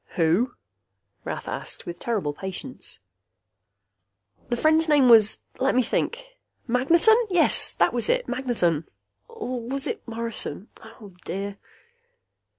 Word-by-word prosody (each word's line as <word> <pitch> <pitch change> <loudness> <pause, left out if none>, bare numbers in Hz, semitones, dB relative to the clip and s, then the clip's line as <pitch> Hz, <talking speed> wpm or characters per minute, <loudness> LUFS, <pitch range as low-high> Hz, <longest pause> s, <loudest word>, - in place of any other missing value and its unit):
"Who?" 180 +10 +1 0.7
Rath - - -6
asked, - - -6
with 175 0 -7
terrible 200 -11 -2
patience. 190 +4 -6 1.5
"The 240 - -1
friend's 315 +3 +3
name 285 -4 +5
was 220 -2 +6 0.2
let 270 0 +1
me 255 - +3
think 485 - -2 0.4
Magneton! 330 - +4 0.5
That - - +2
was - - +1
it! - - +1
Magneton! 230 - -1 0.4
Or 250 -1 -6
was 270 +4 0
it - - -3
Morrison? 230 -2 -3
Oh, 220 -3 -14
dear...." 200 +1 -5
235 Hz, 115 wpm, -24 LUFS, 200-270 Hz, 1.5 s, was